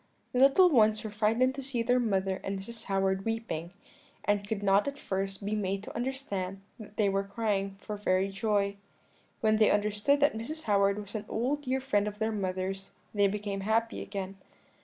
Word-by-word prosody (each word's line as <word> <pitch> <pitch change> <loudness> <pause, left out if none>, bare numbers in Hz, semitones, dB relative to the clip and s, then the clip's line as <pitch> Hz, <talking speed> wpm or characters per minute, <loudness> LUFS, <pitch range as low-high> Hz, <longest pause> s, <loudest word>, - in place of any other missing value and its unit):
"The 250 - 0
little 275 +8 +7
ones 220 -7 +4
were 215 - -5
frightened 225 +5 +2
to 275 - -5
see 255 -3 -2
their 250 +2 +3
mother 195 -5 0
and 195 0 -2
Mrs. 230 +4 -8
Howard 195 0 +1
weeping, 225 -7 -3 0.5
and 205 -1 +1
could 205 -1 -2
not 195 +3 +4
at 280 0 -3
first 195 -3 -3
be 205 - -1
made 195 -1 -1
to - - -9
understand 230 -7 -3 0.2
that 210 -1 -11
they 210 - +3
were 195 0 +2
crying 200 -1 -1
for 210 0 -5
very 190 -1 +1
joy. 200 0 0 0.6
When 215 -1 +3
they 215 -1 +5
understood 210 +7 +2
that 290 - +4
Mrs. 305 +9 -5
Howard 200 -1 +3
was 205 -1 -7
an 215 -1 -4
old 260 +6 0
dear 265 -1 0
friend 210 -6 +1
of 210 0 -5
their 220 +1 0
mother's, 190 -1 -3 0.2
they 205 -1 +4
became 200 0 -3
happy 225 +3 0
again. 195 -1 -5
210 Hz, 190 wpm, -30 LUFS, 195-230 Hz, 0.6 s, little